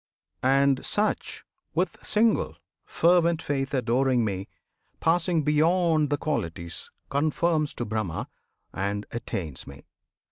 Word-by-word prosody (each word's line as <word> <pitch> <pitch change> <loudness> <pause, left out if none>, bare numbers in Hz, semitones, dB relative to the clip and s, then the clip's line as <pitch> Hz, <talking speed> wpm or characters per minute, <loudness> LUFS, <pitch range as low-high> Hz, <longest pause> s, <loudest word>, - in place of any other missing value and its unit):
And 135 +1 +3
such 210 +1 -1 0.3
With - - -1
single, 210 - +2 0.3
fervent 170 -1 +3
faith 135 -3 -2
adoring 125 0 +2
Me, 95 -2 -3 0.5
Passing 165 -1 +2
beyond 155 +1 +3
the 145 - +1
Qualities, 85 - -3 0.2
conforms 155 +2 +1
To 120 - -3
Brahma, 105 -6 -3 0.5
and 100 +2 -2
attains 90 - -5
Me! 70 0 -11
140 Hz, 105 wpm, -26 LUFS, 110-165 Hz, 0.5 s, And